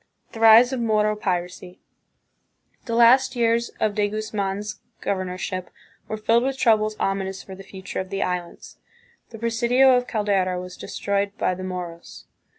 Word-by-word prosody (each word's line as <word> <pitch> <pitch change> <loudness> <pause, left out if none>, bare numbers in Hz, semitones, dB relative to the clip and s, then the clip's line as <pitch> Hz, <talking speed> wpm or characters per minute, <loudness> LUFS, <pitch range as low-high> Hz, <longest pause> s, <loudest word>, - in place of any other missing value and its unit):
The 225 - -9
Rise 225 +3 +7
of 260 - -2
Moro 215 -2 +1
Piracy. 180 -2 -4 1.1
The 230 - -2
last 255 +3 +5
years 235 0 +1
of 215 -1 +1
De 205 0 +1
Guz 215 +1 -5
man's 205 +1 -3 0.2
governorship 185 -1 -3 0.4
were 215 - -4
filled 225 +2 +2
with 265 +1 -2
troubles 215 -3 +2
ominous 195 -1 -2
for 190 - -10
the 190 - -10
future 190 -1 -7
of 190 0 -5
the 195 - -1
Islands. 180 -1 -5 0.5
The 225 - -10
presidio 240 +3 +3
of 250 0 0
Caldera 195 -4 0
was 180 0 -8
destroyed 200 0 -3
by - - 0
the 185 +1 -7
Moros. 180 -2 -7
210 Hz, 155 wpm, -23 LUFS, 185-230 Hz, 1.1 s, Rise